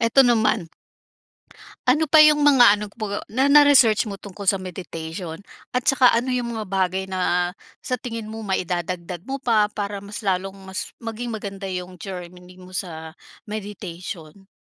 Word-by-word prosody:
eto 235 +4 +5
naman. 220 -5 +2 1.2
Ano 300 +5 +3
pa 305 +1 +8
yung 300 -1 +6
mga 245 -8 +6
ano 210 - -5
po 205 -1 -4
na 265 +5 +2
na-research 270 -7 +6
mo 200 - -5
tungkol 200 0 -10
sa 195 - +5
meditation, 170 -2 -6 0.4
at 250 - +1
tsaka 255 +3 +5
ano 250 +2 0
yung 240 -2 -2
mga 220 - -3
bagay 190 0 0
na 180 -2 0 0.3
sa 250 -3 -2
tingin 230 -3 -6
mo 225 - -6
maidadagdag 180 -1 -3
mo 275 0 -4
pa, 215 -3 +3
para 205 -1 -4
mas 205 +2 -8
lalong 190 0 -1 0.2
mas 190 - -5
maging 230 0 -4
maganda 195 -2 -6
yung 180 -1 -6
journey 180 -1 -9
mo 185 0 -14
sa 160 -3 -5 0.3
meditation? 195 -4 -7
200 Hz, 155 wpm, -23 LUFS, 180-235 Hz, 1.2 s, pa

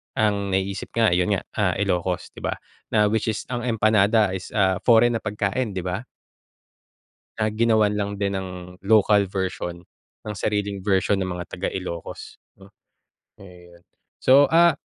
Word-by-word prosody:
ang 105 -4 +1
naiisip 95 +1 -2
nga 115 -2 +4
ayon 90 +3 +2
nga, - - -4 0.2
ah 95 -4 +2
Ilocos, 90 -2 -1
'di - - -10
ba? - - -1 0.4
Na 105 -1 +4
which 110 -1 0
is 105 - -5
ang 120 -1 -3
empanada 110 -2 +3
is, 95 - -6
ah, 95 -2 +3
foreign 120 0 +5
na - - -12
pagkain 105 +2 -2
'di 95 - -3
ba. 90 +4 -3 1.3
Na 110 -1 0
ginawan 110 -2 +3
lang 100 -1 -2
din 100 -1 -1
ng 90 -1 -7
local 105 -1 +3
version, 90 -2 -4 0.4
ng 105 -1 -5
sariling 100 -1 -2
version 95 0 +1
ng 95 - -2
mga 90 0 -5
taga 90 - -2
Ilocos, 90 -3 -7 0.2
'no? 100 +1 -17 0.7
Ayun. 90 -2 -16 0.4
So 140 +2 +6
ah, 170 -1 +4
100 Hz, 155 wpm, -23 LUFS, 95-110 Hz, 1.3 s, So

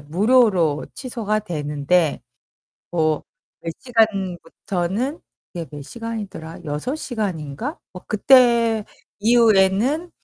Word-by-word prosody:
무료로 180 - +2
취소가 220 -5 -2
되는데 150 -2 0 0.7
뭐 155 -3 +1 0.4
몇 165 - -4
시간부터는 200 - -1 0.3
그게 170 -2 -5
몇 145 -1 -8
시간이더라? 205 - -7
6 150 - -3
시간인가? 210 - -4
뭐 180 - -10
그때 230 -1 +4 0.3
이후에는 230 - +3
200 Hz, 205 characters per minute, -22 LUFS, 165-235 Hz, 0.7 s, 그때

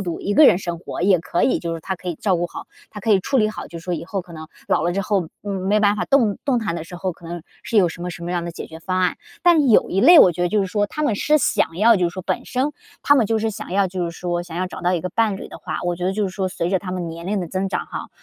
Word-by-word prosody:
独， 175 -4 -4
一 205 - -2
个 300 +5 +7
人 - - +6
生 175 -3 -4
活 170 - -6
也 190 -2 +4
可 170 +1 -2
以。 - - +3
就 170 -1 -4
是 165 - -6
他 190 +3 -4
可 180 - -15
以 170 - -2
照 185 +2 0
顾 175 +1 -1
好， - - -9 0.2
他 210 - -9
可 220 - -1
以 200 - +6
处 270 +8 -1
理 215 -3 +3
好， - - -7
就 170 -1 -9
是 - - -17
说 180 -1 -1
以 - - -5
后 195 +1 -3
可 175 - -15
能 160 -1 -8 0.2
老 155 - +2
了 175 - +1
之 195 - -1
后 195 -3 0 0.2
嗯， 205 - -5 0.2
没 210 +1 +3
办 205 0 +3
法 - - -1
动 235 -8 +2
动 250 -4 +1
弹 210 -6 -2
的 165 - -5
时 175 - -11
候， 185 +1 -2
可 170 0 -12
能 170 -1 -6 0.2
是 230 - -2
有 185 -4 +5
什 165 - -9
么 180 +1 -4
什 170 - -9
么 175 - -4
样 175 -1 -1
的 170 - -5
解 - - -7
决 160 - -10
方 185 +2 -2
案。 180 -1 +1 0.3
但 325 -6 +5
有 - - +4
一 190 - +1
类 330 - +9
我 180 - +7
觉 175 - -6
得 175 - +2
就 210 +2 +1
是 195 - 0
说 205 +1 0
他 305 +8 -5
们 225 -9 +1
是 300 +7 +3
想 165 - +1
要 225 +2 +5
就 175 -2 +1
是 - - -10
说， 185 - -6
本 - - -2
身 265 +3 -1 0.3
他 285 - +5
们 250 -5 +4
就 225 +1 +1
是 225 +1 -1
想 215 -3 -8
要 195 0 +3
就 180 -1 -3
是 170 - -3
说 175 0 -3
想 170 -2 -10
要 185 - 0
找 180 - -9
到 180 +1 +2
一 175 - 0
个 185 - -3
伴 215 0 +1
侣 - - -8
的 - - -10
话， - - -5
我 175 -1 -1
觉 180 - -4
得 190 - +1
就 210 0 -1
是 - - -1
说， 190 0 -3
随 170 -1 -2
着 190 0 +1
他 185 0 -6
们 175 -2 -3
年 170 +2 -8
龄 200 -1 -1
的 175 - -5
增 190 +2 -2
长 - - -3
哈， - - -6
185 Hz, 370 characters per minute, -21 LUFS, 175-210 Hz, 0.3 s, 类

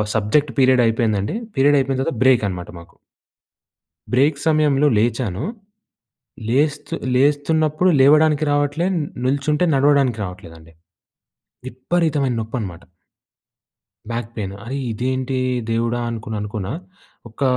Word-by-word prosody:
Subject 125 +7 +1
period 130 -2 +4
అయిపోయిందండి. 110 - 0 0.2
Period 145 +2 +4
అయిపోయిన 135 0 -1
తర్వాత 150 +1 -2
బ్రేక్ 130 -4 +4
అన్నమాట 90 -2 -6
మాకు. 85 - -17 1.2
బ్రేక్ 140 +4 +3
సమయంలో 150 -2 +3
లేచాను. 115 -2 -1 1.1
లేస్త 145 +2 0 0.3
లేస్తున్నప్పుడు 150 +5 +2
లేవడానికి 150 +2 +5
రావట్లేదు. 145 +6 0
న్ 150 - -3 0.2
నిల్చుంటే 145 +5 +1
నడవడానికి 135 -4 +3
రావట్లేదండి. 85 -3 -10 0.9
విపరీతమైన 140 0 0
నొప్పన్నమాట. 110 -7 -5 1.3
Back 115 -1 -3
pain. 100 -2 -4
అరే 130 +4 -5
ఇదేంటి? 130 +3 -2 0.3
దేవుడా! 115 +1 0
అనుకొని 110 -1 -5
అనుకున్న. 105 -2 -5 0.6
ఒక 110 +6 -10
130 Hz, 100 wpm, -20 LUFS, 110-145 Hz, 1.3 s, లేవడానికి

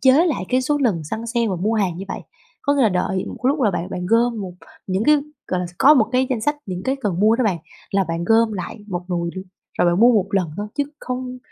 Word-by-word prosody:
chế 260 0 +6
lại 290 - -1
cái 255 +1 +2
số 290 +2 +1
lần 200 - 0
săn 220 +9 -5
sale 235 0 0
và 185 - -1
mua 210 +6 0
hàng 190 -6 0
như 195 - -6
vậy. - - -4 0.4
Có 285 -2 +2
nghĩa 275 - +3
là 225 - +5
đợi 185 0 -1
một - - -7
lúc 280 +3 +2
là 210 - +4
bạn 180 0 -4
bạn 180 0 -4
gom 230 +1 +2
một 185 -2 -5 0.3
những 190 +3 0
cái 300 0 +6 0.3
gọi 180 -1 -1
là 180 - -2
sao, 175 - -13
có 295 +3 +7
một 225 -6 +4
cái 255 +1 +2
danh 235 -4 0
sách 295 +6 0
những 180 -1 -4
cái 265 +5 0
cần 205 -9 -2
mua 220 +2 +5
đó 255 - +1
bạn. 190 -6 +1 0.3
Là 195 -1 +2
bạn 165 +1 -2
gom 225 +1 +3
lại 190 +2 -5
một 180 -2 -4
nùi 170 -1 -1
luôn, 185 - -6 0.3
rồi - - +4
bạn 175 - +1
mua 240 +1 +7
một 205 -4 +2
lần 185 -5 0
thôi 205 +1 -3
chứ 285 - +3 0.2
không 255 0 -5
215 Hz, 280 wpm, -21 LUFS, 185-250 Hz, 0.4 s, có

